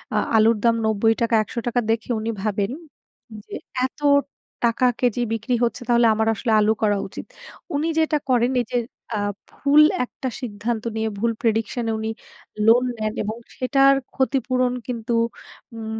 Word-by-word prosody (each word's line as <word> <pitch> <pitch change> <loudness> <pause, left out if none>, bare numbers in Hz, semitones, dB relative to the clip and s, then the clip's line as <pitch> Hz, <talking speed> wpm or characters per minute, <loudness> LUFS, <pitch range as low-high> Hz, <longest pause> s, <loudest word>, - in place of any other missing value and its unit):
আ - - +3 0.2
আলুর 220 +1 +4
দাম 230 -1 +4
৳৯০ 225 +2 +2
৳১০০ 240 +2 -2
দেখে 225 +1 -2
উনি 225 +1 -2
ভাবেন 205 0 -1 0.7
যে, - - -8 0.3
এত 260 - -7 0.7
টাকা 235 +2 +2
কেজি 245 -1 +1
বিক্রি 225 +2 -1
হচ্ছে, 235 - -1
তাহলে 235 -1 +5
আমার 220 +1 0
আসলে 230 +2 -2
আলু 210 +1 +3
করা 205 -2 +2
উচিৎ। 195 - -8 0.5
উনি 300 +3 0
যেটা 315 -1 +2
করেন 245 0 +3
এইযে 240 +1 -3 0.4
আ - - -1 0.3
ভুল 290 +1 +4 0.2
একটা 260 +1 -5
সিদ্ধান্ত 225 -1 -3
নিয়ে, 220 0 -1
ভুল 230 +2 +1
prediction 225 +1 0
এ - - +1
উনি 220 0 -2 0.6
লোন 235 +2 +6
নেন। 215 -1 -2
এবং 215 +2 -3 0.2
সেটার 275 +1 +4 0.2
ক্ষতিপূরণ 255 -2 +1
কিন্তু 235 -1 -3 0.6
উম 220 -1 -5
230 Hz, 150 wpm, -22 LUFS, 220-250 Hz, 0.7 s, লোন